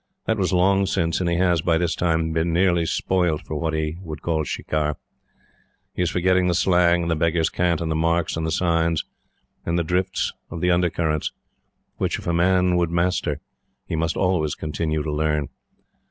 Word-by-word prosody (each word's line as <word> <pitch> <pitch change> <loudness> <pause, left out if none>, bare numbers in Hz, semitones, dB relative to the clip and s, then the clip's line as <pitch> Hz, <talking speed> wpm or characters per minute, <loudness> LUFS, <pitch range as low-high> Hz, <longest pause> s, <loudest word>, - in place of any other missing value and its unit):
That 110 -1 0
was 95 -1 +1
long 95 +2 +3
since, 85 -3 0
and 85 - 0
he 85 - +1
has, 90 -2 +2
by 85 -1 +2
this 85 0 0
time, 80 -2 0
been 80 +1 0
nearly 85 -1 +2
spoilt 90 -5 0
for - - -6
what 80 +1 -1
he 80 +1 -2
would 80 -4 -8
call 80 -2 0
shikar. 75 0 -2 1.0
He - - -3
is 90 - +2
forgetting 90 +1 +2
the 90 - +1
slang, 85 -1 +3
and 85 - -1
the - - +2
beggar's 80 +1 +1
cant, 85 -2 0
and 80 -1 -2
the - - 0
marks, 85 +1 +1
and 80 - -3
the 80 - -1
signs, 85 -1 +1 0.6
and 85 +1 -1
the 85 - +1
drift 90 +3 -1 0.2
of 85 - -6
the 90 +2 +2
undercurrents, 85 -3 0 0.7
which, - - -1
if - - -10
a 85 - 0
man 90 +1 +3
would 85 -1 +1
master, 85 -3 0 0.4
he - - -3
must 80 +1 -1
always 90 -5 +1
continue 80 0 -2
to 75 - -3
learn. 75 -1 0
85 Hz, 195 wpm, -23 LUFS, 80-90 Hz, 1.0 s, long